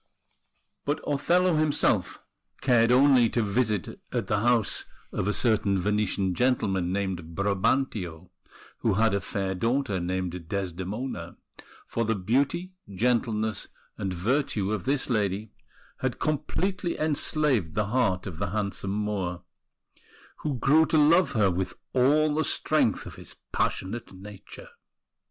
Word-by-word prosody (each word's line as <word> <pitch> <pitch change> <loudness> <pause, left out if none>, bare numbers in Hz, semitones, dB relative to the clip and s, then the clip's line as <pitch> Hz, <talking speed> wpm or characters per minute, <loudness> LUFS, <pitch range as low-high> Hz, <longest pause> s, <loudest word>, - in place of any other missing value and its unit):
But 145 +1 -1
Othello 170 +4 +2
himself 145 - +1 0.4
cared 120 -3 +4
only 130 -2 +5
to 115 - 0
visit 105 -2 -1
at - - -1
the 105 - 0
house 120 -1 +2 0.3
of - - -2
a - - +3
certain 105 -3 +1
Venetian 100 -1 0
gentleman 95 -6 +1
named 90 -4 -3
Brabantio, 100 -3 -1 0.5
who 110 -4 +1
had 110 0 +3
a 100 - 0
fair 95 -1 -2
daughter 115 0 0
named 90 -1 -3
Desdemona; 95 +1 -4 0.5
for 115 - -2
the 110 0 0
beauty, 140 - 0 0.2
gentleness, 110 0 0 0.3
and 95 -2 -3
virtue 105 +1 0
of 105 -2 -2
this 135 +1 +1
lady 105 -3 -1 0.5
had 130 -2 -2
completely 175 +5 -1
enslaved 145 - 0
the 105 -1 +1
heart 105 -5 +1
of 85 -5 -7
the 100 - -1
handsome 100 0 -3
Moor, 100 -4 -2 0.9
who 145 -4 -3
grew 155 +5 +4
to 160 - +2
love 155 +1 +5
her 105 -5 +3
with 95 +2 -3 0.2
all 150 +4 +3
the 155 +1 +1
strength - - +1
of - - -9
his - - -9 0.2
passionate 115 +5 -2
nature. 100 - -11
110 Hz, 130 wpm, -27 LUFS, 95-135 Hz, 0.9 s, only